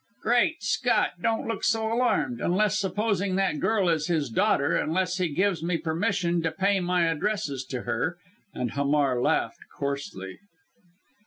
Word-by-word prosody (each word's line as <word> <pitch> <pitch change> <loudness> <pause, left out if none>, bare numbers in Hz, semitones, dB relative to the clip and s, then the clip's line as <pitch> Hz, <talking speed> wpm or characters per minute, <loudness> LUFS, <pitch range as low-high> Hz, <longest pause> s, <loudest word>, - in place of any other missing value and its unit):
"Great 240 +4 +2
Scott! 245 +4 +1
Don't 225 +1 0
look 230 - -3
so 225 0 +1
alarmed! 245 0 +1
Unless 210 +4 +2
supposing 200 -1 0
that 190 -5 0
girl 215 -4 +1
is 160 -3 +1
his 155 -7 0
daughter 140 +5 +2
unless 180 +3 0
he 180 -2 +1
gives 180 +2 0
me 170 0 0
permission 170 +1 0
to 165 - 0
pay 195 +1 +1
my 180 -1 +1
addresses 165 -4 -1
to 130 -2 -5
her!" 125 +9 -2 0.3
and 125 -2 -3
Hamar 140 -3 +1
laughed - - 0 0.2
coarsely. 140 -10 -4
180 Hz, 150 wpm, -26 LUFS, 150-210 Hz, 0.3 s, Great